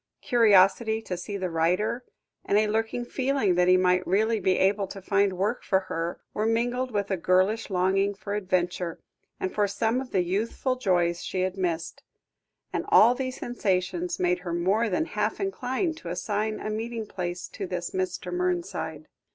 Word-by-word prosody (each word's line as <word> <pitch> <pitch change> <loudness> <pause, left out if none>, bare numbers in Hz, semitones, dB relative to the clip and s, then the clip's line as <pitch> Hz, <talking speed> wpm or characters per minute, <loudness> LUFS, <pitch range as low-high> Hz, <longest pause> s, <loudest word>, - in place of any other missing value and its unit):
Curiosity 220 -1 +4
to 180 - -4
see 190 +3 -5
the 185 -2 -3
writer, 180 +9 +1 0.4
and 200 - +2
a 215 - +4
lurking 225 +3 -1
feeling 260 -6 +1
that 180 0 +3
he 185 0 +6
might 180 0 +2
really 220 +4 +2
be 185 -1 +2
able 195 +1 +2
to 195 - -8
find 200 0 +1
work 205 +6 -1
for 190 -1 +2
her, 170 -2 -4
were 215 +1 0
mingled 245 +3 0
with 205 -3 -2
a 190 - +1
girlish 185 +6 +2
longing 195 +2 +1
for 200 +1 -6
adventure, 180 -3 -1 0.4
and 185 - -2
for 205 -1 +2
some 225 +5 0
of 265 - -8
the 185 -6 +1
youthful 220 +8 -1
joys 175 -7 +1
she 185 - -2
had 185 0 -1
missed; 170 -4 -2 0.7
and - - -1
all 235 +3 +7
these 255 0 -3
sensations 240 - -1
made 180 0 +2
her 175 -2 -5
more 195 +7 +1
than 320 +12 0
half 210 -6 -2
inclined 325 -3 -2
to - - -8
assign 215 +1 -2
a 215 - -4
meeting 225 +1 -3
place 180 -3 -4
to 195 - -6
this 175 -1 -4
Mr. 185 -1 -3
Mernside. 170 -3 -2
200 Hz, 175 wpm, -27 LUFS, 180-225 Hz, 0.7 s, all